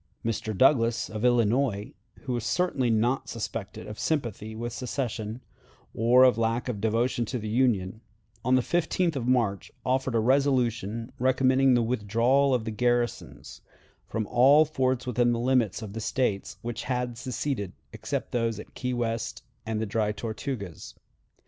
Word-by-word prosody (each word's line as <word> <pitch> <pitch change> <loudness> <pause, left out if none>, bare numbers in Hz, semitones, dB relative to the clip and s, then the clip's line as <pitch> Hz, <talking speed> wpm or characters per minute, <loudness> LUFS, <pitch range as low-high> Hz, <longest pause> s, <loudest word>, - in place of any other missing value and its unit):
Mr. 110 -2 -2
Douglas, 115 -3 +3
of 110 0 -5
Illinois 120 -2 +2 0.3
who 130 - -3
was 120 -2 -2
certainly 135 0 0
not 115 +4 +1
suspected 110 -2 -5
of 105 - -8
sympathy 110 -8 -2
with 120 +1 -4
secession, 120 -3 -4 0.5
or 125 +3 +6
lack 115 +1 -1
of 110 -5 -3
devotion 115 +3 +1
to 125 +3 -3
the 110 -2 -5
Union 110 -4 +1 0.4
on 125 +2 +3
the 130 - +3
15th 175 +1 0
of 125 -3 -3
March 115 -6 +1
offered 130 -1 0
a - - +4
resolution 120 -3 +1
recommending 130 +1 +3
the 120 - +3
withdrawal 120 +4 +2
of 125 -4 +1
the 110 - -3
garrisons 120 +1 -2 0.5
from 110 -1 -2
all 135 +7 +5
forts 130 -4 0
within 120 -1 +2
the 115 - -1
limits 120 -4 +1
of 100 -2 -7
the 115 - -5
States 105 -3 -1
which 120 0 -4
had 125 -2 -2
seceded, 120 -4 -3 0.2
except - - -4
those 115 -3 -1
at - - -11
Key 125 -1 -3
West 115 -1 -3 0.2
and 110 -1 -1
the 110 - -1
Dry 105 0 0
Tortugas. 110 - -6
120 Hz, 155 wpm, -27 LUFS, 110-130 Hz, 0.5 s, or